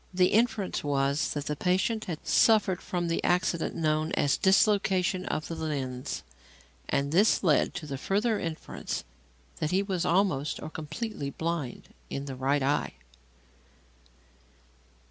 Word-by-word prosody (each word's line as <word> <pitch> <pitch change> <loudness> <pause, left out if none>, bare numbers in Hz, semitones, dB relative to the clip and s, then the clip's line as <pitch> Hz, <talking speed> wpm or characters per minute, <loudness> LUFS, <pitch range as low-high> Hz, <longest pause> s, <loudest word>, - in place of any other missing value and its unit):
The 180 0 +3
inference 220 -3 +1
was 140 0 +1
that 145 -1 -4
the 150 - -2
patient 190 +7 0
had 165 -5 -6
suffered 210 -5 +4
from 175 -1 -2
the 165 - -1
accident 175 -2 +1
known 155 0 0
as 145 - +2
"dislocation 190 -2 +2
of 155 - -2
the - - -5
lens"; 140 -6 -3 0.7
and 140 +1 0
this 200 +7 +4
led 155 -6 +3
to 155 - -5
the 140 -3 -5
further 210 - +1
inference 165 -2 -4 0.5
that 155 - -1
he 190 +3 +2
was 190 -4 -1
almost 170 -6 +1
or 155 - -7
completely 155 +1 -5
blind 160 -3 -4 0.2
in 140 - -4
the 135 -2 -5
right 135 +2 +1
eye. 145 +2 0
165 Hz, 140 wpm, -28 LUFS, 145-190 Hz, 0.7 s, suffered